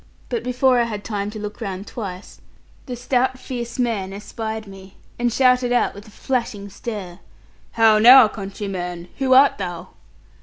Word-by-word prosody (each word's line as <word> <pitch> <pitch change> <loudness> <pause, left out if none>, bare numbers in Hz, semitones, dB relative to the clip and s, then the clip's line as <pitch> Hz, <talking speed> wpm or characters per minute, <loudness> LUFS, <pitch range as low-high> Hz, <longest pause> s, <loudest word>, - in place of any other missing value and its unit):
But 240 -2 -2
before 250 0 +2
I 235 - +2
had 210 -3 -5
time 205 -2 -3
to 215 - -8
look 210 +2 -7
round 195 -2 -5
twice, 195 -5 -8 0.5
the 250 - -4
stout 255 +1 0
fierce 245 -1 -6
man 220 -6 -1
espied 220 +2 -6
me, 195 -1 -13 0.2
and 240 0 +1
shouted 250 0 +3
out 245 - +2
with 205 +2 -12
a - - -13
flashing 215 -3 -3
stare' 200 -4 -7 0.5
'How 220 -2 +5
now, 245 +2 +9
countryman, 195 -4 -6
who 260 -1 +3
art 275 -3 +5
thou?' 180 -1 -5
220 Hz, 160 wpm, -21 LUFS, 195-245 Hz, 0.5 s, now